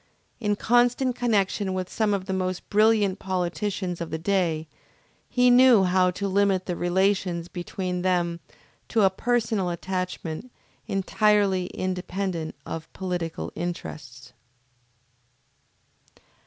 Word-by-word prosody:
In 210 Hz, -3 st, 0 dB
constant 245 Hz, +3 st, +2 dB
connection 200 Hz, -5 st, 0 dB
with 185 Hz, -1 st, -2 dB
some 215 Hz, +1 st, 0 dB
of 195 Hz, -2 st, -1 dB
the 190 Hz, -, -3 dB
most 185 Hz, -1 st, -2 dB
brilliant 210 Hz, -2 st, +3 dB
politicians 185 Hz, 0 st, -2 dB
of 170 Hz, -, -4 dB
the 160 Hz, -, -3 dB
day, 165 Hz, -3 st, 0 dB, 0.6 s
he 250 Hz, 0 st, +4 dB
knew 245 Hz, -4 st, +7 dB
how 185 Hz, 0 st, +3 dB
to 200 Hz, +3 st, -3 dB
limit 195 Hz, -1 st, +2 dB
the 180 Hz, -, -2 dB
relations 180 Hz, -1 st, 0 dB
between 180 Hz, +1 st, -4 dB
them 175 Hz, -2 st, 0 dB, 0.5 s
to 220 Hz, -3 st, +2 dB
a 190 Hz, -, +5 dB
personal 220 Hz, -3 st, 0 dB
attachment 180 Hz, +3 st, -4 dB, 0.4 s
entirely 195 Hz, -2 st, +2 dB
independent 185 Hz, -2 st, -3 dB
of 165 Hz, 0 st, -6 dB
political 175 Hz, -3 st, -4 dB
interests. 135 Hz, -7 st, -6 dB
185 Hz, 115 wpm, -25 LUFS, 175-205 Hz, 0.6 s, knew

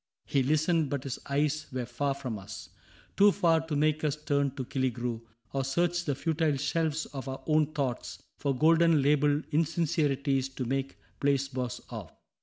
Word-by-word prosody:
" -, -, -59 dB
He 140 Hz, -, +4 dB
listened, 155 Hz, +3 st, +2 dB
but 140 Hz, -2 st, -2 dB
his 135 Hz, -, -4 dB
eyes 150 Hz, +2 st, 0 dB
were 130 Hz, -1 st, -3 dB
far 135 Hz, +4 st, -1 dB
from 125 Hz, -6 st, -5 dB
us 95 Hz, -, -9 dB, 0.2 s
— -, -, -28 dB
Too 205 Hz, +1 st, +7 dB
far 165 Hz, -4 st, +3 dB
to 155 Hz, -, -2 dB
make 155 Hz, +1 st, +2 dB
us 150 Hz, -2 st, +1 dB
turn 145 Hz, -2 st, 0 dB
to 130 Hz, -2 st, -4 dB
Killigrew, 125 Hz, -3 st, -2 dB, 0.3 s
Or 135 Hz, -1 st, 0 dB
search 175 Hz, +5 st, 0 dB
the 145 Hz, -, 0 dB
futile 160 Hz, 0 st, 0 dB
shelves 155 Hz, +2 st, 0 dB
of 135 Hz, -2 st, -7 dB
our 130 Hz, -, -6 dB
own 155 Hz, -1 st, +2 dB
thoughts 130 Hz, -4 st, -2 dB, 0.2 s
For 140 Hz, -2 st, 0 dB
golden 165 Hz, 0 st, +5 dB
labeled 145 Hz, +1 st, +3 dB
insincerities 145 Hz, -4 st, +1 dB
To 130 Hz, -1 st, -5 dB
make 135 Hz, +2 st, -2 dB, 0.2 s
placebos 135 Hz, -3 st, 0 dB
of. -, -, -7 dB
145 Hz, 175 wpm, -29 LUFS, 135-155 Hz, 0.3 s, Too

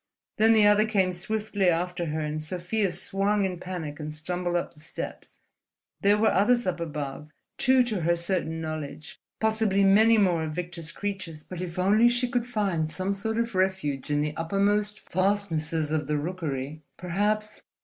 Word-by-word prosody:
Then 220 Hz, +1 st, +6 dB
the 215 Hz, -2 st, +6 dB
other 210 Hz, +1 st, +5 dB
came 190 Hz, -4 st, +2 dB
swiftly 205 Hz, +1 st, 0 dB
after 175 Hz, +1 st, -1 dB
her, 155 Hz, +1 st, -2 dB
and 155 Hz, 0 st, -3 dB
Sofia 180 Hz, +6 st, -1 dB
swung 195 Hz, +3 st, 0 dB
in 180 Hz, -2 st, -3 dB
panic 170 Hz, -5 st, -5 dB
and 150 Hz, 0 st, -5 dB
stumbled 175 Hz, +3 st, -3 dB
up 175 Hz, -, -1 dB
the 150 Hz, -, -19 dB
steps. 155 Hz, -, -8 dB, 0.6 s
There 205 Hz, +1 st, +4 dB
were 220 Hz, +1 st, +3 dB
others 240 Hz, +4 st, +3 dB
up 180 Hz, -2 st, -1 dB
above, 150 Hz, -2 st, -5 dB, 0.3 s
two 260 Hz, 0 st, +5 dB
to 220 Hz, -7 st, -2 dB
her 170 Hz, +1 st, +2 dB
certain 170 Hz, -2 st, -2 dB
knowledge, 155 Hz, -2 st, -6 dB, 0.2 s
possibly 220 Hz, -3 st, +2 dB
many 220 Hz, +4 st, +6 dB
more 180 Hz, -6 st, +3 dB
of 155 Hz, -, -4 dB
Victor's 170 Hz, -2 st, -4 dB
creatures; 185 Hz, -6 st, -5 dB
but 180 Hz, -1 st, -7 dB
if 175 Hz, -1 st, -6 dB
only 210 Hz, +6 st, +5 dB
she 245 Hz, +1 st, 0 dB
could 240 Hz, -1 st, -1 dB
find 195 Hz, -9 st, 0 dB
some 185 Hz, +4 st, -2 dB
sort 220 Hz, +3 st, -2 dB
of 235 Hz, 0 st, -1 dB
refuge 185 Hz, -8 st, -1 dB
in 145 Hz, 0 st, +1 dB
the 150 Hz, 0 st, -2 dB
uppermost 205 Hz, +4 st, 0 dB
fastnesses 165 Hz, -5 st, -1 dB
of 155 Hz, -2 st, -1 dB
the 150 Hz, 0 st, 0 dB
rookery, 150 Hz, -3 st, -4 dB, 0.2 s
perhaps 210 Hz, +4 st, -1 dB
180 Hz, 170 wpm, -27 LUFS, 160-205 Hz, 0.6 s, Then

